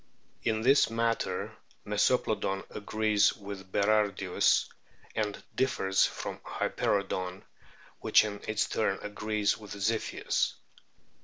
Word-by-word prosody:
In 110 -1 0
this 135 +1 +5
matter 115 0 -1 0.3
Meso - - +3
plodon 95 0 -2
agrees 105 0 +2
with 100 -2 -9
Berardius, 100 -3 +2 0.5
and 105 -2 -2
differs 95 -7 +2
from - - -6
Hyperoodon, 95 -2 -2 0.6
which - - +5
in 100 -1 -5
its 110 -1 +1
turn 100 -3 0
agrees 105 0 -1
with 105 -2 -9
Ziphius. 110 +3 0
105 Hz, 100 wpm, -30 LUFS, 100-110 Hz, 0.6 s, this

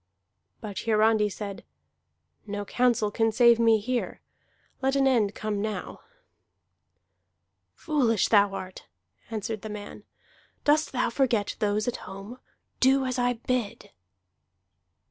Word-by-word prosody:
But 205 -3 -7
Hiarandi 215 -1 +3
said: 200 -1 -7 0.8
"No 205 0 -4
counsel 235 -2 +1
can 225 +1 +1
save 235 +1 +5
me 225 -1 +5
here. 240 +4 -3 0.6
Let 265 +1 +1
an 275 -1 +3
end 225 -6 +2
come 210 -2 -3
now." 210 -3 -4 1.8
"Foolish 245 - +1
art 195 -2 +2
thou," 90 +1 -38
answered 215 0 -4
the 220 - -7
man. 210 -1 -8 0.6
"Dost 305 +1 +2
thou 250 -2 0
forget 235 -5 0
those 210 +1 0
at 245 - -1
home? 200 +6 -10 0.4
Do 265 +1 +4
as 255 0 -2
I 245 0 +2
bid!" 240 -2 -3
220 Hz, 120 wpm, -27 LUFS, 205-245 Hz, 1.8 s, save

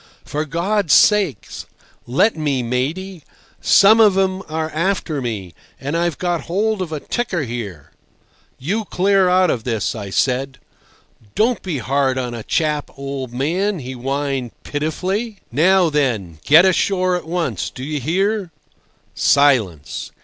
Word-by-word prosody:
"For 150 +1 -3
God's 170 +3 +1
sake 205 -9 +3 0.6
let 145 - +2
me, 145 -5 -1
matey! 155 +10 -3 0.4
Some 215 +3 +6
of 210 -4 +5
'em 190 0 +1
are 160 0 -3
after 165 -3 -1
me—and 115 - -6
I've 170 -2 0
got 175 -2 -2
hold 205 +3 0
of 175 -3 -4
a 155 - -3
ticker 185 -3 -2
here." 110 - -6 0.7
"You 200 - -2
clear 195 0 +2
out 185 -1 +4
of 115 - -3
this!" 115 -4 -1
I 105 -3 -6
said. 130 +5 0 0.8
"Don't 230 +2 +2
be 175 -6 -3
hard 130 +2 0
on 125 -2 -3
a 115 - -5
chap, 150 +3 -1
old 135 -2 -5
man!" 175 +11 -1
he 130 -4 -7
whined 135 -1 -3
pitifully. 185 +9 -3
"Now 175 +5 +3
then, 110 - -1
get 160 +5 +7
ashore 185 0 +2
at 175 - -5
once. 175 0 -2
Do 130 - -9
you 150 +1 -3
hear?" 190 - 0 0.6
Silence. 120 - +2
155 Hz, 140 wpm, -19 LUFS, 130-185 Hz, 0.8 s, get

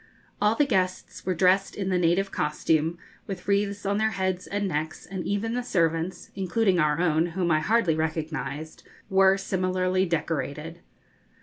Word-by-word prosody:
All 210 +2 +3
the 295 - +3
guests 185 -7 -2
were 185 - +1
dressed 190 +3 +3
in 195 -2 -2
the 185 -1 +2
native 180 +3 +2
costume, 155 +2 0 0.3
with 190 -3 -6
wreaths 200 0 0
on 200 +1 +1
their 220 0 +2
heads 190 -1 -1
and 205 0 -1
necks, 155 -2 -3
and 190 -2 -5
even 205 +3 -1
the 250 - 0
servants 165 -5 -1
including 190 0 +1
our 150 0 +2
own, 165 -1 +2
whom 175 0 -1
I 155 - +4
hardly 195 0 +2
recognised 155 -1 -3 0.3
were 190 0 +5
similarly 185 -1 0
decorated. 165 0 -3
185 Hz, 160 wpm, -26 LUFS, 165-195 Hz, 0.3 s, were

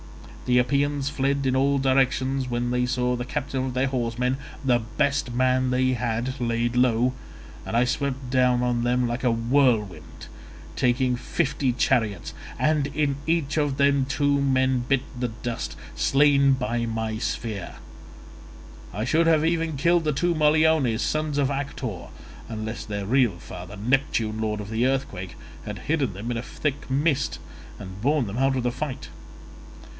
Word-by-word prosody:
The 125 0 +4
Epeans 140 +2 +1
fled 140 -1 0
in 130 0 +2
all 140 +1 +3
directions 130 0 +1
when 120 0 -1
they 125 0 +1
saw 125 0 0
the 120 - -3
captain 130 0 -3
of 130 - -4
their 130 +2 +2
horsemen 125 0 -1 0.3
(the 125 -2 +4
best 140 +3 -1
man 130 +1 +2
they 130 +1 +2
had) 120 +2 -2
laid 120 0 0
low, 125 0 +3 0.5
and 115 - -1
I 120 - +4
swept 130 +1 -2
down 125 -1 +3
on 120 -1 0
them 125 0 +1
like 120 +2 -3
a 125 - +3
whirlwind, 115 - 0 0.5
taking 125 0 +2
fifty 135 +2 -1
chariots—and 130 - 0
in 145 -1 -1
each 160 -3 0
of 145 -3 0
them 140 -1 +3
two 140 +1 +1
men 130 -1 +2
bit 125 +2 0
the 125 0 -1
dust, 115 +1 -5 0.2
slain 140 -1 +4
by 120 -2 -1
my 110 -1 -3
spear. 110 -2 -4 1.2
I 105 +4 -2
should 165 +5 +2
have 160 -1 +4
even 165 -2 0
killed 170 +4 +3
the 155 - +1
two 175 +5 +1
Moliones, 155 -6 +3
sons 155 -1 -1
of 140 -1 +1
Actor, 135 -7 -4 0.4
unless 110 -1 -5
their 100 -2 -4
real 120 -4 +2
father, 90 +3 -9
Neptune 110 -2 0
lord 105 -1 -1
of 105 +1 -7
the 115 +2 +1
earthquake, 130 -9 -3 0.3
had - - -6
hidden 140 - +1
them 105 +6 -5
in 120 - -2
a - - -2
thick 140 +3 -4
mist 140 +1 +1 0.4
and 95 0 -9
borne 145 +1 +2
them 105 +4 -4
out 135 0 +2
of 125 - -1
the 125 - +1
fight. 130 +1 -5
130 Hz, 160 wpm, -25 LUFS, 120-140 Hz, 1.2 s, The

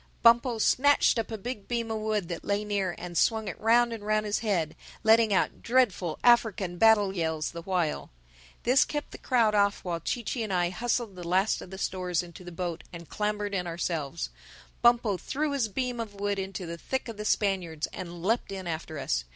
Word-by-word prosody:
Bumpo 235 0 +5
snatched 265 +2 +4
up 225 - -3
a 220 - -4
big 210 -1 -6
beam 235 -2 -2
of 220 - -2
wood 215 -4 -1
that 170 -1 -5
lay 205 +1 -1
near 195 -4 -1
and 175 0 -7
swung 220 +5 +2
it 185 - -5
round 235 +2 +4
and 220 -2 -7
round 215 0 +1
his 210 0 0
head, 190 -8 -1 0.3
letting 225 0 +5
out 195 - +1
dreadful 230 -9 +1
African 220 -7 +3
battle 210 -3 +5
yells 160 -3 -1
the 170 - -7
while. 175 -3 -1 0.5
This 255 +3 +5
kept 295 -1 -4
the - - -10
crowd 235 -5 +2
off 200 -1 +2
while 175 -2 -2
Chee 235 +8 -3
Chee 235 +2 -3
and 215 -3 -3
I 175 -1 +1
hustled 230 0 -1
the 175 -2 -7
last 190 +4 +2
of - - -10
the 190 - -8
stores 180 -3 -1
into 175 +1 -11
the 175 - -9
boat 170 -1 -4
and 170 -2 -10
clambered 210 -1 -2
in 180 -2 -1
ourselves. 155 - -3 0.5
Bumpo 235 -4 +4
threw 295 - -2
his 275 -5 0
beam 245 +3 -3
of 215 -3 -5
wood 200 0 -1
into 190 -1 -4
the 170 0 -6
thick 265 +7 -3
of 230 -3 -7
the 210 - -4
Spaniards 185 -7 0
and 175 -2 -7
leapt 225 +2 0
in 190 -1 -5
after 160 -2 -4
us. - - -1
200 Hz, 210 wpm, -28 LUFS, 175-225 Hz, 0.5 s, Bumpo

